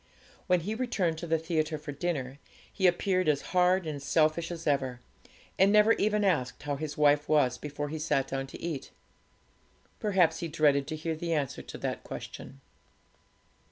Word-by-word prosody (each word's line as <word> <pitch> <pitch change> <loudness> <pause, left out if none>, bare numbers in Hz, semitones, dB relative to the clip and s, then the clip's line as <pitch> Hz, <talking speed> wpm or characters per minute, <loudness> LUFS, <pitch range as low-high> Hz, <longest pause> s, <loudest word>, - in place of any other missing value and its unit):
When 180 -1 +3
he 205 +6 -3
returned 200 -9 -1
to 170 - -6
the 165 0 +2
theatre 160 -1 -1
for 150 0 -7
dinner, 140 -3 -3 0.3
he 190 - +3
appeared 185 -1 +2
as 145 -2 +2
hard 180 0 +3
and 150 -3 -4
selfish 155 +3 +1
as 170 -2 -6
ever, 130 -4 0 0.6
and 195 +2 +6
never 210 +2 +6
even 210 0 +1
asked 155 -12 0
how 145 -1 -2
his 150 +1 -5
wife 145 0 +3
was 130 -5 +3
before 145 0 -5
he 160 +1 -4
sat 150 -4 0
down 135 0 -3
to - - -10
eat. 155 -6 -4 1.1
Perhaps 180 -6 +2
he 170 - -3
dreaded 150 -3 +2
to 155 - -3
hear 160 +1 -3
the 170 +1 -2
answer 145 -5 -2
to - - -9
that - - -4
question. 135 - -9
155 Hz, 175 wpm, -29 LUFS, 145-175 Hz, 1.1 s, and